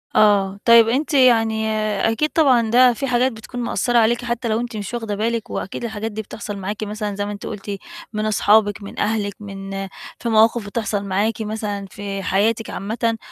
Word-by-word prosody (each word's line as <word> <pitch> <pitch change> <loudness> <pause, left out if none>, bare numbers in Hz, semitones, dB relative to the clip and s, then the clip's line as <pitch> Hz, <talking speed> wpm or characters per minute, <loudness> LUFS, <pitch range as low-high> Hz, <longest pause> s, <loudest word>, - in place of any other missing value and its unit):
آه، 200 -2 +4
طيب 230 -1 +7
أنتِ 295 +6 0
يعني 225 -5 +4 0.4
أكيد، 300 +7 0
طبعًا 255 -9 +3
ده 250 0 +6
في 275 +4 -3
حاجات 250 +1 +2
بتكون 225 +2 -8
مأثرة 240 0 0
عليكِ، 235 +1 +3
حتى 235 0 -2
لو 220 0 +1
أنتِ 240 -2 -4
مش 205 +2 -6
واخدة 225 -3 -3
بالِك، 225 +2 -2
وأكيد 195 - -5
الحاجات 220 -1 -4
دي 220 +1 -4
بتحصل 205 0 -7
معاكِ 205 +3 -4
مثلًا، 210 -1 -4
زي 205 0 -2
ما 205 - -4
أنتِ 205 0 -7
قُلتِ 205 -1 -5 0.4
من 215 0 -1
أصحابِك، 210 -1 +3
من 200 - -8
أهلِك، 210 -2 0
من 195 -1 -8 0.5
في 235 - -3
مواقف 225 0 +4
بتحصل 205 -1 -2
معاكِ 205 +3 -1
مثلًا 210 -2 -3
في 200 -1 -5
حياتِك 220 +4 +1
عامةً، 225 +3 -2
220 Hz, 185 wpm, -21 LUFS, 205-235 Hz, 0.5 s, طيب